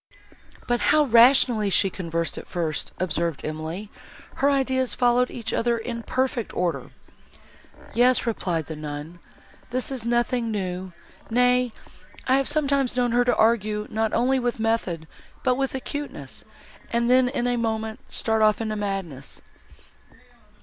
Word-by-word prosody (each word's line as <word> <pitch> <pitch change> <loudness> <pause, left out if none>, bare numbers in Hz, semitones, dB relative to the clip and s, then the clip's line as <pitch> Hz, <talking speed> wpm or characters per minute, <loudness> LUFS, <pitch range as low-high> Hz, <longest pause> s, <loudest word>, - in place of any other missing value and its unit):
"But 240 0 +1
how 305 0 +4
rationally 235 -3 +5
she 195 0 +3
conversed, 170 -2 -3
at - - -12
first!" 160 -5 -3
observed 170 -3 -2
Emily, 160 +7 -5 0.5
"her 280 - +3
ideas 260 -2 +1
followed 245 0 +3
each 225 -2 -5
other 235 0 +1
in 235 +1 -5
perfect 255 -1 -2
order." 170 -7 -1 1.0
"Yes," 245 +1 +4
replied 180 -8 -1
the 160 - -6
nun, 150 +3 -7 0.5
"this 255 +2 -2
is 260 -4 -4
nothing 240 0 0
new; 185 -3 -3 0.4
nay, 250 +1 +3 0.6
I 260 +1 +4
have 275 - +1
sometimes 280 -4 +1
known 245 -1 +2
her 245 +1 +3
argue 215 -2 +2
not 220 0 0
only 260 +2 +2
with 245 -2 -2
method, 205 -8 -1 0.4
but 255 - +3
with 270 +1 -2
acuteness, 285 +2 -6 0.5
and 235 0 +1
then, 255 0 +4
in 250 -2 -2
a 245 0 +1
moment, 220 -1 -2
start 220 -1 +1
off 215 -1 +4
into 215 -1 -2
madness." 195 -10 -5
230 Hz, 140 wpm, -24 LUFS, 190-250 Hz, 1.0 s, rationally